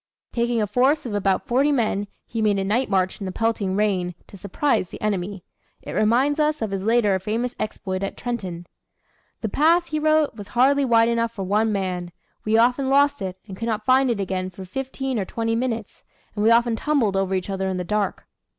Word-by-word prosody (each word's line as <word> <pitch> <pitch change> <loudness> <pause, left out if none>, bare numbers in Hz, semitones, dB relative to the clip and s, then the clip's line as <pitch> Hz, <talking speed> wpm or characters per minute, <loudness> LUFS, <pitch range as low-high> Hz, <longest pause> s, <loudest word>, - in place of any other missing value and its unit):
Taking 235 0 0
a - - +1
force 260 +9 +2
of 235 - -4
about 195 -2 +1
forty 270 +5 +2
men 215 -6 0 0.2
he 230 - -4
made 210 -2 +2
a 195 - 0
night 220 +7 0
march 185 -2 0
in 200 - -5
the - - -3
pelting 210 -2 -1
rain, 190 -4 0
to - - -14
surprise 200 +1 0
the - - -9
enemy. 200 -2 -2 0.4
It - - -7
reminds 255 +8 +2
us 305 0 +1
of 220 -3 -3
his 195 -1 -2
later 215 -3 +3
famous 230 +6 -2
exploit 190 -3 -3
at 195 - -4
Trenton. 190 -8 -4 0.8
"The 220 - -2
path," 335 - +3
he 310 - -1
wrote, 310 -1 +2
"was 205 -2 -9
hardly 270 +5 +3
wide 230 -2 +4
enough 230 0 0
for 195 - -5
one 210 +4 +1
man. 180 -3 -2 0.3
We 215 +1 +2
often 250 +3 +3
lost 285 -1 +3
it, 185 -1 -4
and 190 - -7
could 230 +4 -4
not 215 -2 -2
find 260 0 +4
it 230 -4 0
again 185 -1 -2
for 190 +1 -10
fifteen 265 +3 -3
or 195 - -1
twenty 225 +3 -2
minutes, 230 -3 -3 0.3
and 210 - -2
we 220 - +5
often 235 0 +4
tumbled 235 -6 +1
over 195 0 0
each 185 +1 -3
other 190 0 -2
in 190 -1 -2
the 180 - -2
dark." 205 +1 -2
220 Hz, 215 wpm, -23 LUFS, 195-250 Hz, 0.8 s, we